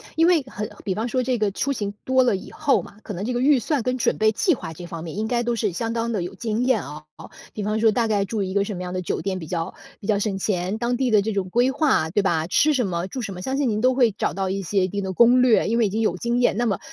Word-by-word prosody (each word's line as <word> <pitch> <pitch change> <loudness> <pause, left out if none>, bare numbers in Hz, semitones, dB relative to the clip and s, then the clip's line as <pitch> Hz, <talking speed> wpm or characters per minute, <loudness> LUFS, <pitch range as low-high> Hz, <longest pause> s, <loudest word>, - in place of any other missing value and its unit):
因 325 - +4
为 345 -3 +4
很 215 -5 -6 0.2
比 190 - -2
方 220 +4 -2
说 255 +1 0
这 250 0 0
个 210 -2 0
出 275 +8 -1
行 205 -5 -3
多 260 0 +3
了 245 -5 +2
以 190 - -8
后 300 -3 +1
嘛， 200 - -14
可 210 - -6
能 190 +2 -4
这 250 - -2
个 245 - -1
预 275 0 +5
算 285 +3 -1
跟 250 +1 -1
准 245 - +1
备 215 0 +3
计 335 - +2
划 165 - -7
这 175 +3 -9
方 165 -1 -7
面， 170 +3 -7
应 215 +1 -1
该 240 0 0
都 240 0 0
是 215 -3 0
相 225 +6 -2
当 230 0 -1
地 210 -5 -1
有 175 - -5
经 225 +1 -2
验 250 -7 +2
哦。 75 - -9 0.5
比 210 - -4
方 215 +2 -1
说 220 0 +4
大 230 +2 +1
概 205 -2 +1
住 210 +1 -3
一 190 0 -4
个 200 0 +2
什 205 - -5
么 180 - -6
样 180 0 -5
的 185 - -2
酒 180 - -3
店 195 -1 -2
比 165 - -7
较 170 +1 -3 0.3
比 200 - -9
较 215 -2 +2
省 200 -1 -1
钱， 190 0 -1
当 240 +2 0
地 255 -1 0
的 210 -2 +5
这 220 +2 -2
种 195 -2 -2
规 240 +6 +3
划， 270 - +2
对 200 +5 +1
吧？ 165 -4 +1
吃 300 - +3
什 250 -6 +1
么、 175 0 -2
住 255 +6 -5
什 200 -4 -5
么， 180 - -8
相 265 +7 -2
信 280 -3 +1
您 210 -1 -1
都 255 +2 +4
会 250 -3 +3
找 200 - -2
到 190 -1 -2
一 195 +1 -2
些 195 +1 0
一 - - -2
定 200 +2 -3
的 190 - -3
攻 240 +5 +5
略， 250 -3 +4
因 230 - +1
为 235 - +3
已 - - -3
经 215 +3 -1
有 185 -5 +1
经 235 +4 -1
验。 245 - +2
那 240 - +1
么， 200 -6 0
215 Hz, 345 characters per minute, -23 LUFS, 190-245 Hz, 0.5 s, 预